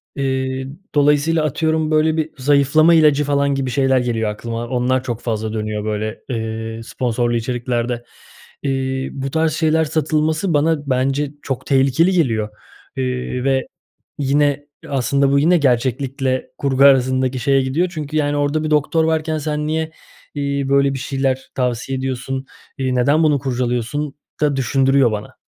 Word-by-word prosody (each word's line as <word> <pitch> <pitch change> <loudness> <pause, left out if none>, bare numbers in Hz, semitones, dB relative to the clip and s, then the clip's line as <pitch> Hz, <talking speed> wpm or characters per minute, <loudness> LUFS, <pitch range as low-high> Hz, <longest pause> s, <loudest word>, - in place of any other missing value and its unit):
İii, 130 -1 -2 0.3
dolayısıyla 150 +2 +3
atıyorum 160 +1 0
böyle 155 +1 +2
bir 160 0 -1
zayıflama 145 +4 +4
ilacı, 150 -2 +5
falan, 140 -1 +1
gibi 135 -1 -2
şeyler 135 0 +2
geliyor 115 -3 -1
aklıma. 115 +2 -5
Onlar 125 +1 0
çok 120 -3 -4
fazla 110 -2 -3
dönüyor 105 -1 -3
böyle, 110 +1 -3
eee, 115 -1 -4
sponsorlu 120 0 -1
içeriklerde. 120 0 -2 0.6
İii, 135 -1 -1
bu 135 0 -3
tarz 160 -1 +1
şeyler 160 0 +2
satılması 155 +3 0
bana 145 -1 +1
bence 135 +3 0
çok 135 -3 -4
tehlikeli 135 +6 +3
geliyor, 115 - +1 0.5
iii, 125 -1 -2
ve 135 -1 +1 0.5
yine, 145 +1 +1 0.2
aslında, 140 +1 +1
bu 140 - +4
yine 170 +4 +4
gerçeklikle 130 0 0
kurgu 135 -1 +1
arasındaki 130 -1 +4
şeye 135 +2 +2
gidiyor 155 +8 0
çünkü, 155 -1 -4
yani, 145 -1 +1
orada 145 +2 0
bir 155 - -2
doktor 150 +2 +2
varken 160 -1 0
sen 150 0 -2
niye, 160 0 -1 0.4
eee, 140 -1 -1
böyle 140 0 +3
bir 135 - -4
şeyler 135 -1 -2
tavsiye 125 +1 -1
ediyorsun? 130 0 -3 0.3
İii, 130 -1 -1
neden 145 +6 +3
bunu 150 -3 +3
kurcalıyorsun 125 +3 -2 0.3
da 145 -2 +2
düşündürüyor 135 -1 +3
bana. 105 -1 -6
135 Hz, 145 wpm, -19 LUFS, 125-150 Hz, 0.6 s, ilacı